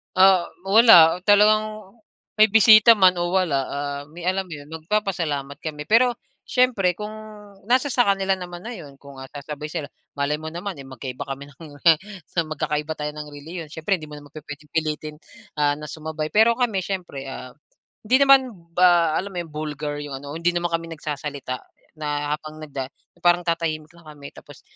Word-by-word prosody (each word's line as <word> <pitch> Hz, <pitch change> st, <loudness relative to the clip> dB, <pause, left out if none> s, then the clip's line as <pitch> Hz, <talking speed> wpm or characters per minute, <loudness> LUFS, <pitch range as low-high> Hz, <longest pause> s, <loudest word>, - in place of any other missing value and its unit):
Ah, 185 Hz, -2 st, +5 dB, 0.2 s
wala, 195 Hz, -5 st, +7 dB
talagang 215 Hz, 0 st, +3 dB, 0.5 s
may 215 Hz, 0 st, +7 dB
bisita 220 Hz, +1 st, +8 dB
man 185 Hz, -3 st, +5 dB
o 175 Hz, +1 st, -1 dB
wala, 180 Hz, -7 st, +2 dB
ah, 140 Hz, 0 st, -4 dB
may, 165 Hz, +3 st, -11 dB
alam 190 Hz, +2 st, 0 dB
mo 175 Hz, -, -8 dB
'yon, 145 Hz, 0 st, -12 dB
magpapasalamat 160 Hz, -5 st, -2 dB
kami. 150 Hz, -2 st, -6 dB
Pero, 245 Hz, +2 st, +4 dB, 0.3 s
siyempre 225 Hz, -8 st, +2 dB
kung 210 Hz, +3 st, -6 dB, 0.6 s
nasa 255 Hz, +4 st, +2 dB
sa 245 Hz, -2 st, +2 dB
kanila 195 Hz, -1 st, +1 dB
naman 175 Hz, -1 st, -8 dB
na 235 Hz, -, -6 dB
'yon, 145 Hz, -, -10 dB
kung 140 Hz, 0 st, -14 dB, 0.2 s
sasabay 150 Hz, +1 st, -6 dB
sila. 150 Hz, -2 st, -5 dB, 0.3 s
Malay 145 Hz, +1 st, -1 dB
mo 155 Hz, -, -7 dB
naman, 180 Hz, +1 st, -5 dB
eh, 135 Hz, -, -9 dB
magkaiba 130 Hz, +1 st, -7 dB
kami 140 Hz, +1 st, -7 dB
ng 130 Hz, -, -25 dB, 0.9 s
magkakaiba 150 Hz, 0 st, -2 dB
tayo 150 Hz, 0 st, -4 dB
ng 150 Hz, 0 st, -8 dB
relihiyon, 155 Hz, +3 st, -8 dB
siyempre 185 Hz, +5 st, -1 dB
hindi 155 Hz, -, -9 dB
mo 150 Hz, -, -10 dB
naman 145 Hz, -1 st, -13 dB
pu-puwedeng 150 Hz, -1 st, -10 dB
pilitin, 155 Hz, -1 st, -2 dB, 0.4 s
ah, 145 Hz, -1 st, +3 dB
na 150 Hz, 0 st, -9 dB
sumabay. 155 Hz, -1 st, -5 dB
Pero 220 Hz, +2 st, +5 dB
kami 230 Hz, -5 st, 0 dB
siyempre, 180 Hz, -7 st, -5 dB
ah, 130 Hz, -1 st, -8 dB, 0.5 s
hindi 245 Hz, +5 st, +3 dB
naman 270 Hz, -3 st, +5 dB, 0.2 s
ba 175 Hz, -2 st, +4 dB
alam 200 Hz, +1 st, -6 dB
mo -, -, -6 dB
'yong, 165 Hz, -, -14 dB
vulgar 150 Hz, -1 st, -4 dB
'yong 145 Hz, -2 st, -6 dB
ano, 145 Hz, -, -8 dB
hindi 170 Hz, +1 st, +1 dB
naman 175 Hz, 0 st, 0 dB
kami 165 Hz, 0 st, -2 dB
nagsasalita 145 Hz, -4 st, -5 dB, 0.4 s
na, 150 Hz, -1 st, -2 dB
habang 155 Hz, 0 st, -11 dB
nagda 140 Hz, -3 st, -5 dB, 0.4 s
parang 175 Hz, 0 st, +5 dB
tatahimik 165 Hz, -3 st, -2 dB
lang 170 Hz, -, -19 dB
kami 150 Hz, -2 st, -11 dB
tapos, -, -, -15 dB
160 Hz, 175 wpm, -23 LUFS, 150-195 Hz, 0.9 s, bisita